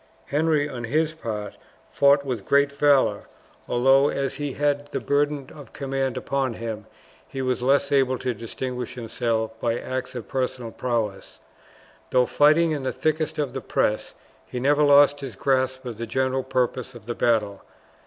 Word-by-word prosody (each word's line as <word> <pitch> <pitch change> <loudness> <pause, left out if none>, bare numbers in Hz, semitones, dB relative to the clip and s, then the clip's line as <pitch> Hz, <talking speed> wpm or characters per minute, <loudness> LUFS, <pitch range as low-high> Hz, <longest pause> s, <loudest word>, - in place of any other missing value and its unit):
Henry 150 0 +1
on 120 -4 -6
his 155 +6 0
part 105 -9 -5 0.3
fought 140 0 +4
with 125 -7 -3
great 140 0 +4
valour, 140 -7 +3 0.4
although, 135 +3 +4
as 135 -1 -2
he 145 -2 -3
had 145 0 -1
the - - -2
burden 145 -1 0
of 145 -3 -13
command 135 -2 -2
upon 135 -3 -1
him, 110 -2 -6 0.4
he 135 - -7
was 130 -1 -1
less 140 +2 +2
able 130 -2 +3
to 125 - -2
distinguish 125 +3 -5
himself 115 -1 -2
by 115 0 0
acts 130 0 -5
of 115 -5 -6
personal 125 -3 -3
prowess. 115 -6 -3 0.7
Though 125 -1 +3
fighting 155 +5 +4
in 150 -2 -2
the 130 - -1
thickest 155 0 -1
of 145 -4 -2
the 135 - -4
press, 105 -1 -1 0.3
he 125 - -5
never 145 +4 +3
lost 145 0 +6
his 135 -6 -7
grasp 130 +3 0
of 115 -3 -6
the 115 - -4
general 130 +2 0
purpose 125 -1 -2
of 120 - -12
the 120 - -3
battle. 110 -4 +1
130 Hz, 165 wpm, -24 LUFS, 120-145 Hz, 0.7 s, lost